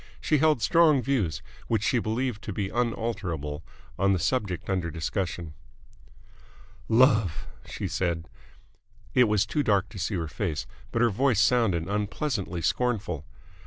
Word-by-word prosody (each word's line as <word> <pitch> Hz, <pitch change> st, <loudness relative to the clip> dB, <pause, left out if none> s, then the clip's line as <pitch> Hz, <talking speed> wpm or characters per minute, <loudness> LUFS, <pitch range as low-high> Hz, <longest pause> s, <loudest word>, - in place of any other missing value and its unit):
She 150 Hz, -, +2 dB
held 155 Hz, -6 st, +3 dB
strong 160 Hz, +1 st, +5 dB
views, 110 Hz, -, 0 dB, 0.2 s
which 110 Hz, -3 st, 0 dB
she 120 Hz, -, +2 dB
believed 115 Hz, 0 st, -2 dB
to -, -, -4 dB
be 100 Hz, 0 st, -2 dB
unalterable, 100 Hz, -, -2 dB, 0.4 s
on 100 Hz, +1 st, +3 dB
the -, -, +2 dB
subject 95 Hz, -1 st, -1 dB
under 95 Hz, -3 st, -1 dB
discussion. 85 Hz, 0 st, -3 dB, 1.4 s
"Love!" 110 Hz, -, +4 dB, 0.2 s
she -, -, -4 dB
said. 85 Hz, -3 st, -2 dB, 0.9 s
It 125 Hz, -, +6 dB
was 105 Hz, -2 st, +2 dB
too 145 Hz, +9 st, 0 dB
dark 100 Hz, -8 st, +2 dB
to 100 Hz, -, -9 dB
see 100 Hz, +3 st, -1 dB
her 85 Hz, -3 st, -2 dB
face, 80 Hz, -2 st, -3 dB, 0.3 s
but 115 Hz, -, +1 dB
her 120 Hz, -, +4 dB
voice 120 Hz, 0 st, +2 dB
sounded 100 Hz, -7 st, +3 dB
unpleasantly 100 Hz, -, -2 dB
scornful. 105 Hz, -, -1 dB
105 Hz, 140 wpm, -27 LUFS, 90-120 Hz, 1.4 s, It